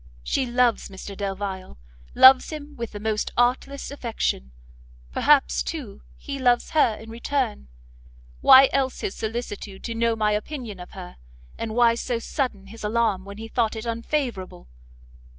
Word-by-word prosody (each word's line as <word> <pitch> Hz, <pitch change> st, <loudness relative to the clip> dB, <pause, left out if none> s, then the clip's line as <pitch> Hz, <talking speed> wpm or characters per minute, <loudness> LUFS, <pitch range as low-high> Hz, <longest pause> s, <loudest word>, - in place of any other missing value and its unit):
She 255 Hz, -, 0 dB
loves 240 Hz, -2 st, +1 dB
Mr 195 Hz, +1 st, -9 dB
Delvile, 195 Hz, -, -5 dB, 0.4 s
loves 260 Hz, 0 st, +8 dB
him 300 Hz, -1 st, -8 dB
with 235 Hz, -2 st, -5 dB
the 205 Hz, -, -7 dB
most 215 Hz, 0 st, -1 dB
artless 255 Hz, +4 st, 0 dB
affection; 230 Hz, -, -3 dB, 0.6 s
perhaps, 60 Hz, 0 st, +3 dB
too, 60 Hz, +2 st, -6 dB, 0.2 s
he 275 Hz, -, -6 dB
loves 245 Hz, -2 st, +2 dB
her 290 Hz, -8 st, +3 dB
in 225 Hz, +1 st, -11 dB
return, 235 Hz, -, -2 dB, 0.7 s
why 265 Hz, -, +8 dB
else 265 Hz, -1 st, 0 dB
his 190 Hz, -, -3 dB
solicitude 215 Hz, -3 st, -5 dB
to 230 Hz, -, -4 dB
know 230 Hz, 0 st, +1 dB
my 215 Hz, -1 st, +1 dB
opinion 215 Hz, -1 st, -4 dB
of 180 Hz, -, -11 dB
her, 185 Hz, -2 st, -9 dB, 0.4 s
and 220 Hz, -1 st, -5 dB
why 240 Hz, -1 st, +5 dB
so 235 Hz, +1 st, -2 dB
sudden 230 Hz, -4 st, -3 dB
his 225 Hz, +3 st, -12 dB
alarm 210 Hz, -3 st, 0 dB
when 200 Hz, 0 st, -9 dB
he 225 Hz, +1 st, -7 dB
thought 225 Hz, -1 st, 0 dB
it 220 Hz, +1 st, -6 dB
unfavourable? 230 Hz, -, -3 dB
225 Hz, 150 wpm, -24 LUFS, 200-250 Hz, 0.7 s, loves